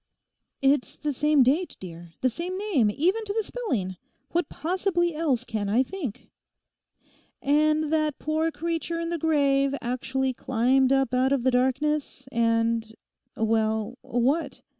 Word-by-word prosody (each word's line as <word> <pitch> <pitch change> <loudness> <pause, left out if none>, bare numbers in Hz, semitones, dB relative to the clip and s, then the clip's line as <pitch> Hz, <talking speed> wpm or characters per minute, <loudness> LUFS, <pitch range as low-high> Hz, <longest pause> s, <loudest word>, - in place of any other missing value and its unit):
'It's 275 -1 +2
the 295 -2 -2
same 300 +1 +4
date, 300 +9 +1
dear, 170 -2 -10
the 255 - +3
same 355 +8 -4
name 370 - +2
even 360 - +1
to 405 -2 -3
the 445 0 0
spelling; 235 - -3 0.3
what 345 -3 0
possibly 345 0 0
else 285 -6 0
can 210 -4 -3
I 235 +6 +3
think?' 275 - -6 1.1
'And 305 +2 +2
that 310 -2 +1
the - - -22
poor 315 +1 +1
creature 335 +2 -3
in 335 0 -3
the 340 - -2
grave 280 -3 +2
actually 260 +2 -1
climbed 255 +2 +2
up 270 -2 +2
out 255 +1 +2
of 275 -3 +1
the 260 - +3
darkness 265 +2 0
and—well, 225 -1 -1
what? 260 +7 -1
275 Hz, 140 wpm, -26 LUFS, 240-320 Hz, 1.1 s, same